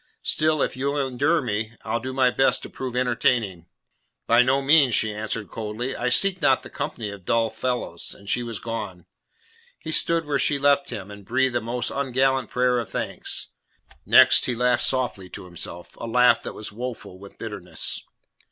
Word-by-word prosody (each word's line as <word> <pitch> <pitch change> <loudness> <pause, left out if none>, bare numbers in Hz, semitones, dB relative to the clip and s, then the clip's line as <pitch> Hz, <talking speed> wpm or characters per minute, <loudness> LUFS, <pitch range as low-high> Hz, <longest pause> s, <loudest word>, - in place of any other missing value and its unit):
Still, 155 -1 +2
if - - -2
you'll 140 +3 -1
endure 140 +4 +1
me, 110 -1 -2
I'll 115 - -1
do 130 +3 -5
my 130 -1 +3
best 135 +2 +2
to - - -9
prove 130 -2 -5
entertaining." 120 -7 0 0.6
"By 120 +1 +5
no 130 +2 +3
means," 140 -3 +5
she 110 -1 +2
answered 105 -2 -4
coldly. 115 +4 -4
"I 125 - -1
seek 185 +8 +2
not 130 - +3
the - - -11
company 120 -7 -4
of 100 -2 -10
dull 115 +3 +1
fellows." 110 -7 -3
And 100 - -17
she 120 - 0
was 115 -2 -5
gone. 95 -7 -6 0.7
He 160 - -7
stood 165 +1 +2
where 145 -2 0
she 145 - +2
had 140 - -5
left 140 0 +3
him, 100 0 -6
and 100 0 -11
breathed 130 +4 +1
a 120 - +1
most 120 +2 -2
ungallant 135 -1 +1
prayer 125 0 +2
of 115 - -5
thanks. - - -2 0.5
Next - - +6
he 125 - 0
laughed 125 +1 +2
softly 125 -8 -1
to - - -7
himself, 85 0 -7
a 115 - -6
laugh 120 0 +4
that - - -6
was 110 - -7
woeful 115 -4 -7
with 100 0 -13
bitterness. - - -3
125 Hz, 190 wpm, -24 LUFS, 110-135 Hz, 0.7 s, Next